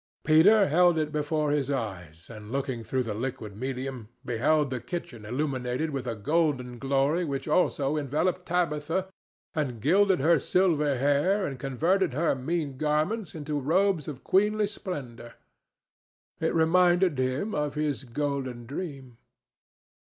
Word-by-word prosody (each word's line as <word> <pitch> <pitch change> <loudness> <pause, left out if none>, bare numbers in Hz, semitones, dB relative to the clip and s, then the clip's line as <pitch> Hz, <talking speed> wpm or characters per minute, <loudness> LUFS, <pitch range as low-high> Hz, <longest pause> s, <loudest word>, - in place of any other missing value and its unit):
Peter 195 +7 +6
held 175 +2 +4
it 155 -1 -1
before 150 0 0
his 145 -2 0
eyes, 95 - -5
and, 105 -1 -10
looking 130 -3 -2
through 130 +4 -1
the 115 -3 -4
liquid 115 -2 -5
medium, 130 -1 -5 0.2
beheld 140 +5 +1
the 130 - -2
kitchen 120 -6 -6
illuminated 130 +2 -2
with 135 -3 -4
a 115 - -2
golden 130 -1 0
glory 140 +6 +1
which 140 -3 -3
also 150 -3 +1
enveloped 155 +5 -1
Tabitha 170 +1 -1 0.4
and 140 -8 -2
gilded 190 - +3
her 160 +3 +4
silver 150 -5 +2
hair 145 +10 +2
and 135 -2 -5
converted 165 +6 +1
her 160 +3 +2
mean 140 +1 -3
garments 155 +7 0
into 150 -1 -3
robes 170 +3 +1
of 140 -4 -7
queenly 210 +2 +2
splendor. 140 - -7 1.0
It - - 0
reminded 175 -1 +3
him 130 +11 -1
of 150 -1 -2
his 150 -3 -1
golden 130 -2 -3
dream. 135 -4 -7
145 Hz, 140 wpm, -27 LUFS, 130-165 Hz, 1.0 s, Peter